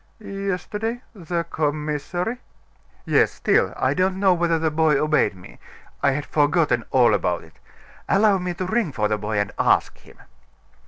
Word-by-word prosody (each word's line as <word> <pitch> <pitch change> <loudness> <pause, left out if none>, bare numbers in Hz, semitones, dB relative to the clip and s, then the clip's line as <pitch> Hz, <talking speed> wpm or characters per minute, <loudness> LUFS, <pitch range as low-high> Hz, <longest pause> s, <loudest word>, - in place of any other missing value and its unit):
"Yesterday 210 +4 -4
the 175 -4 -3
commissary?" 155 - -2 0.7
"Yes. - - +3
Still, - - +1
I - - +1
don't 185 +1 0
know 195 -2 +4
whether 170 -1 +1
the 160 -1 0
boy 155 -2 +2
obeyed 150 -9 +1
me. 90 -10 -14 0.4
I 140 - +3
had 145 +1 -3
forgotten 150 -4 +1
all 125 -3 +4
about - - 0
it. - - -20 0.5
Allow 200 0 +4
me 180 -1 -3
to 185 - -3
ring 215 -3 0
for 105 -5 0
the 105 0 -1
boy, 105 +1 -3
and 100 0 0
ask - - +2
him." - - -19
165 Hz, 160 wpm, -22 LUFS, 145-190 Hz, 0.7 s, know